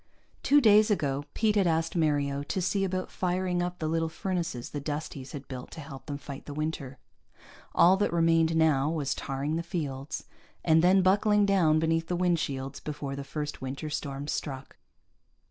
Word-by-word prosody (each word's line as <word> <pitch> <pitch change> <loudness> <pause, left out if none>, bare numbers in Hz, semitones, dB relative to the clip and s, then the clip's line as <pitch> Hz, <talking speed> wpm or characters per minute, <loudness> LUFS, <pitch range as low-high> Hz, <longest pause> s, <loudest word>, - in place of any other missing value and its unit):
Two 290 - +5
days 215 -3 +6
ago 145 -8 0
Pete 215 -1 +2
had 195 -3 +3
asked 165 +1 0
Mario 145 -4 +1
to 145 +6 -3
see 195 +2 0
about 185 -1 -2
firing 180 -1 -1
up 180 0 -3
the 155 - -2
little 165 0 0
furnaces 170 -8 -3
the 145 - -3
Dusties 145 -2 -5
had 140 -2 -7
built 125 -2 -7
to - - -8
help 135 -3 -9
them 145 -1 -3
fight 140 -1 -9
the 145 - -6
winter. 155 -3 -3 0.8
All 185 +3 +6
that 205 - +1
remained 165 -1 +3
now 155 -3 +3
was 145 -4 -1
tarring 140 +4 -3
the - - -1
fields, 145 -5 -4 0.4
and 160 0 +5
then 185 +1 +5
buckling 205 +2 +4
down 180 -6 +4
beneath 165 +1 +1
the 180 - -1
wind 175 -1 +2
shields 135 -1 -4
before 145 -2 -5
the 140 - -5
first 150 +1 -5
winter 135 +4 -5
storms 140 0 -4
struck. 135 -2 -5
160 Hz, 180 wpm, -28 LUFS, 140-180 Hz, 0.8 s, days